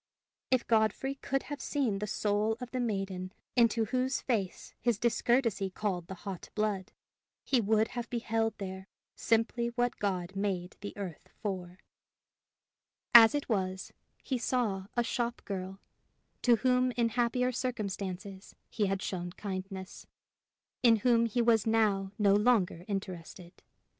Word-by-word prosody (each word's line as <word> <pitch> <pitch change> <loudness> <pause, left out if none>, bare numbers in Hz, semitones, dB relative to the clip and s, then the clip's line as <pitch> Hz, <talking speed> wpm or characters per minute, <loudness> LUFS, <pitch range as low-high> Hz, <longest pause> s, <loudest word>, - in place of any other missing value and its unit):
If 255 -2 +2
Godfrey 225 +4 +2
could 270 0 -2
have 290 -1 -6
seen 250 -9 0
the 210 - -3
soul 210 +2 0
of 250 -1 -7
the 255 - -2
maiden 195 -5 -2 0.2
into 230 -2 +4
whose 255 +3 0
face 205 -8 -2
his 240 -3 +2
discourtesy 235 -3 +1
called 185 -3 -3
the 190 - -6
hot 195 -3 -6
blood, 210 -3 -1 0.5
he 255 -3 +2
would 220 +1 +2
have 240 -1 -5
beheld 225 -2 -1
there 190 -1 -6 0.3
simply 230 +1 +1
what 245 0 0
God 190 -2 -2
made 190 -3 -2
the 205 - -7
earth 185 -6 -7
for; 185 -3 -4 1.4
as 230 +2 +10
it 290 - -2
was, 190 -4 -2 0.3
he 260 -3 -1
saw 215 -6 0
a 240 - +4
shop 240 0 -2
girl, 190 -1 -5 0.6
to 240 -2 +5
whom 255 +1 +2
in 235 -1 +1
happier 245 +2 +1
circumstances 200 -5 -4 0.2
he 210 -3 +1
had 195 0 -1
shown 175 -2 -3
kindness, 190 -1 -6 0.7
in 235 -2 +6
whom 235 -1 +5
he 235 +2 +1
was 230 -2 +3
now 205 -4 +2
no 205 -3 +4
longer 205 -5 +2
interested. 185 -3 -6
215 Hz, 140 wpm, -31 LUFS, 195-240 Hz, 1.4 s, as